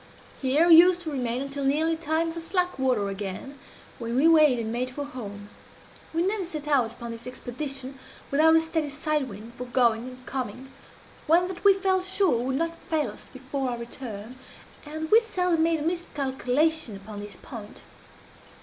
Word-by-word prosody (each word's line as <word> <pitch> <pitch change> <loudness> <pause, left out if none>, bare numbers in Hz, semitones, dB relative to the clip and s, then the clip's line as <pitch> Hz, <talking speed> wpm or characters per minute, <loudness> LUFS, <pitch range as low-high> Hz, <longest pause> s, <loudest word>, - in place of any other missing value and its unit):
Here 285 +5 +3
we 330 -2 +9
used 355 +1 +7
to 320 -3 -5
remain 250 -2 -1
until 275 0 -4
nearly 310 +4 +2
time 325 +1 0
for 335 - -5
slack 360 0 -1
water 250 -6 +1
again, 200 +7 -6 0.4
when 235 0 -3
we 280 +5 +5
weighed 305 -6 +6
and 225 -1 -3
made 250 +2 -1
for 285 +3 -5
home. 205 -7 -8 0.6
We 330 +1 +1
never 395 +1 0
set 305 -4 -6
out 260 -6 +2
upon 235 0 -7
this 230 +1 -8
expedition 265 +1 -6 0.3
without 315 +3 +5
a 325 - +6
steady 320 -2 -2
side 295 -1 -1
wind 215 +3 -10
for 250 - -4
going 240 -1 +2
and 255 0 -11
coming 260 0 -5 0.6
one 340 +3 +4
that 370 -2 -7
we 400 -1 +7
felt 380 -1 +1
sure 375 - +2
would 260 +1 -1
not 330 +1 -2
fail 310 -2 +1
us - - -13
before 265 0 -3
our 240 - -3
return 235 -1 -8 0.5
and 315 +1 -5
we 445 - +9
seldom 360 -7 0
made 330 0 +3
a 300 - -4
miscalculation 295 - 0
upon 205 +1 -9
this 205 0 -9
point. 215 -4 -10
275 Hz, 180 wpm, -26 LUFS, 245-325 Hz, 0.6 s, we